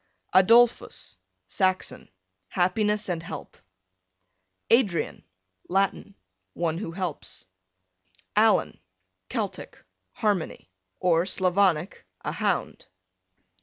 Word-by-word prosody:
Adolphus, 230 +6 +4 0.3
Saxon, 185 -1 -1 0.4
happiness 210 - +1
and 175 -3 -2
help. 165 - -8 1.2
Adrian, 200 -10 +2 0.5
Latin, 195 +1 0 0.4
one 165 -1 -1
who 180 -5 -5
helps. 175 - -5 0.9
Alan, 215 0 +3 0.5
Celtic, - - -4 0.4
harmony; 195 - -2 0.3
or 175 0 +2
Slavonic, 185 -2 +1 0.2
a - - -3
hound. - - -2
185 Hz, 75 wpm, -26 LUFS, 175-210 Hz, 1.2 s, Adolphus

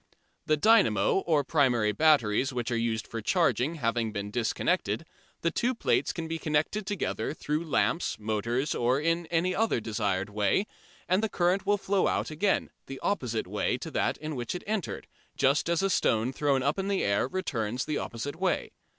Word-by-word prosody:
The 155 - +3
dynamo 190 - +4
or 155 -4 +3
primary 125 -8 +2
batteries 135 -3 +3
which 125 -1 -3
are - - +1
used 115 -1 -1
for 115 - -6
charging 145 - +1
having 115 -5 -1
been 100 -1 -4
disconnected, 115 +1 0 0.4
the 170 - +1
two 250 +2 0
plates - - +1
can 165 -1 -5
be 165 0 -3
connected 155 +7 -1
together 205 -6 -2
through 150 +2 -2
lamps, 165 +3 +1
motors, 115 +6 -1
or 125 +3 +1
in 165 +2 0
any 175 +3 +1
other 225 - +1
desired 105 -3 -2
way, 105 - +1 0.4
and 185 +3 +2
the 220 - 0
current 180 +1 +1
will 205 0 +3
then - - -19
flow 195 -1 +2
out - - -1
again, 195 +6 0 0.2
the 135 0 -7
opposite 125 - -1
way - - -1
to - - -7
that - - 0
in 155 0 -5
which 120 +5 -3
it 180 - -6
entered, 210 -4 -3 0.3
just 140 +4 +2
as 170 +2 +1
a 195 - +2
stone 115 -4 +1
thrown 140 -2 +1
up 145 +7 0
in 195 - -2
the 200 -1 0
air 100 +4 +1
returns 125 - -2
the 150 -1 -1
opposite 140 +7 -5
way. 185 +1 -1
145 Hz, 185 wpm, -28 LUFS, 115-175 Hz, 0.4 s, dynamo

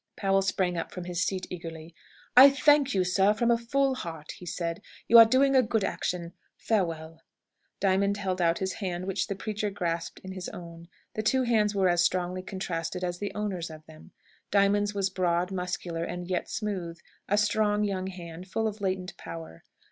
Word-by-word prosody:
Powell 195 -1 +2
sprang 185 -2 0
up - - -5
from 180 - -6
his 175 0 -1
seat 185 -1 -2
eagerly. 165 -2 -8 0.4
"I 265 +3 +11
thank 285 -1 +3
you, 185 - +3
sir, 190 +3 +3
from 235 +1 +2
a 235 - +4
full 270 +3 +1
heart," 160 -10 -6
he 180 - -11
said. 170 0 -3 0.3
"You 230 +1 +9
are 230 - +11
doing 270 +3 +3
a 260 - +7
good 225 -3 0
action. 175 -2 -3 0.2
Farewell." 165 -6 -2 0.6
Diamond 200 +1 +2
held 185 -2 -2
out 170 -1 +3
his 190 -1 -2
hand, 185 -3 -4
which 195 -1 -1
the 200 - -3
preacher 210 +1 -3
grasped 170 -4 -3
in 190 - -7
his 185 -1 -6
own. 170 -1 -10 0.3
The 215 - -2
two 260 +4 +2
hands 215 -4 +2
were 190 -2 +3
as 175 -1 +3
strongly 180 +1 0
contrasted 180 -2 -4
as 175 -1 -2
the 205 - -3
owners 195 -5 -3
of 155 -1 -11
them. 155 +3 -15 0.4
Diamond's 205 +1 +2
was 195 -1 0
broad, 180 0 0
muscular, 180 -2 -3
and 175 +1 -5
yet 180 -1 -2
smooth 185 -6 -3 0.3
a 205 - +3
strong 210 0 +2
young 190 -2 -2
hand, 175 -1 -8
full 220 +3 -1
of 215 -1 -5
latent 185 -2 -2
power. 165 - -9
185 Hz, 190 wpm, -28 LUFS, 175-205 Hz, 0.6 s, I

